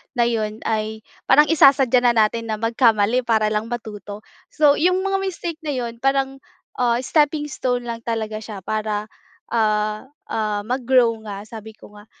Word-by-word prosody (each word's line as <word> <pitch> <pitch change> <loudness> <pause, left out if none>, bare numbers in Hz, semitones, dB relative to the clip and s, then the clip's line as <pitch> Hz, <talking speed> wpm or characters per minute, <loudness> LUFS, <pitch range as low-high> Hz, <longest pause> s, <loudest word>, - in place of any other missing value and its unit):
na 240 - +3
'yon 215 -2 -2
ay 220 0 -2 0.2
parang 295 +3 +6
isasadya 270 -5 +5
na 240 -1 +4
natin 230 +1 +1
na 215 - -2
magkamali 225 0 +2
para 220 -2 +2
lang 215 +1 -1
matuto. 210 -3 -7 0.3
So 295 -2 +4
'yong 365 +3 +3
mga 390 0 0
mistake 345 -4 -4
na 300 - -2
'yon, 235 -2 -4
parang, 270 0 0 0.4
ah, 240 -1 +2
steppingstone 290 -4 0
lang 230 -1 -4
talaga 220 -2 -3
siya 210 -2 -8
para, 215 -1 -2 0.4
ah, 215 0 0 0.2
ah, 210 -2 -1
mag-grow 250 -1 +3 0.2
nga 200 -1 -6
sabi 220 0 -10
ko 210 - -16
nga. 205 - -16
230 Hz, 155 wpm, -21 LUFS, 215-265 Hz, 0.4 s, parang